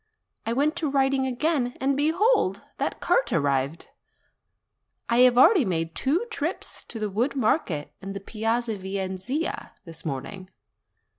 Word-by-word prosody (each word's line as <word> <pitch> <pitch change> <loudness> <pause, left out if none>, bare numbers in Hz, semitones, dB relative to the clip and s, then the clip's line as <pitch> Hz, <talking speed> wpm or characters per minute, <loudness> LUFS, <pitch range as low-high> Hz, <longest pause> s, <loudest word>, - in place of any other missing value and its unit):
I 230 - +1
went 295 +5 +1
to 315 -4 -1
writing 270 -1 +2
again, 260 -1 0
and 270 +1 +1
behold! 320 - +2 0.2
that - - -2
cart - - +2
arrived. 140 +1 0 1.2
I 235 +1 +2
have 250 -1 +6
already 340 - +7
made 165 -5 -1
two 325 - 0
trips - - -3
to 230 - -8
the 215 -1 -1
wood 240 +8 0
market 215 - 0
in 195 0 -6
the 200 - -5
Piazza 225 +1 -2
Venezia 190 - -3
this 165 -1 -9
morning. 165 +6 -5
235 Hz, 140 wpm, -26 LUFS, 190-275 Hz, 1.2 s, already